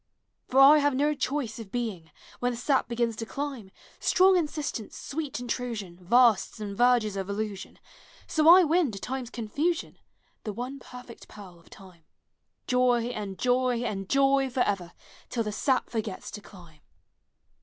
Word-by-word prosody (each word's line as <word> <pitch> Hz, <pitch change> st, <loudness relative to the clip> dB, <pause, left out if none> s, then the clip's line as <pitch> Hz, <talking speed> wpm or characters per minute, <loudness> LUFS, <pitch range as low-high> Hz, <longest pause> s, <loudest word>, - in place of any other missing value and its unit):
For 265 Hz, -, +2 dB
I 285 Hz, +3 st, +8 dB
have 290 Hz, -2 st, +1 dB
no 295 Hz, +3 st, +2 dB
choice 270 Hz, -5 st, -3 dB
of 210 Hz, -4 st, -9 dB
being, 215 Hz, -10 st, -4 dB, 0.3 s
When 245 Hz, 0 st, 0 dB
the -, -, -6 dB
sap 265 Hz, +2 st, +1 dB
begins 235 Hz, -1 st, -1 dB
to 225 Hz, -, -4 dB
climb, 275 Hz, -8 st, -5 dB, 0.2 s
— -, -, -26 dB
Strong 375 Hz, +1 st, +4 dB
insistence, 300 Hz, -, -3 dB
sweet 290 Hz, -4 st, -5 dB
intrusion, 230 Hz, -7 st, -5 dB
Vasts 230 Hz, +2 st, +3 dB
and 205 Hz, -2 st, -5 dB
verges 240 Hz, -3 st, +3 dB
of 195 Hz, 0 st, -4 dB
illusion, 200 Hz, -1 st, -5 dB, 0.3 s
— -, -, -25 dB
So 315 Hz, 0 st, +5 dB
I 365 Hz, +2 st, +9 dB
win, 335 Hz, -1 st, +2 dB
to 195 Hz, -, -6 dB
time's 255 Hz, 0 st, -5 dB
eonfusion, 285 Hz, -, -2 dB, 0.5 s
The 210 Hz, -, -4 dB
one 255 Hz, +5 st, -6 dB
perfect 250 Hz, -2 st, -12 dB
pearl 185 Hz, -4 st, -13 dB
of 170 Hz, -, -22 dB
time, 180 Hz, -4 st, -15 dB, 0.6 s
Joy 250 Hz, -2 st, +2 dB
and 205 Hz, -4 st, -6 dB
joy 250 Hz, -1 st, +1 dB
and 195 Hz, -5 st, -4 dB
joy 275 Hz, -1 st, +3 dB
forever, 205 Hz, -9 st, -1 dB, 0.4 s
Till 235 Hz, -2 st, -1 dB
the 210 Hz, -, -4 dB
sap 255 Hz, +5 st, 0 dB
forgets 220 Hz, -4 st, -4 dB
to 210 Hz, -, -8 dB
climb! 170 Hz, -6 st, -16 dB
245 Hz, 165 wpm, -27 LUFS, 205-270 Hz, 0.6 s, I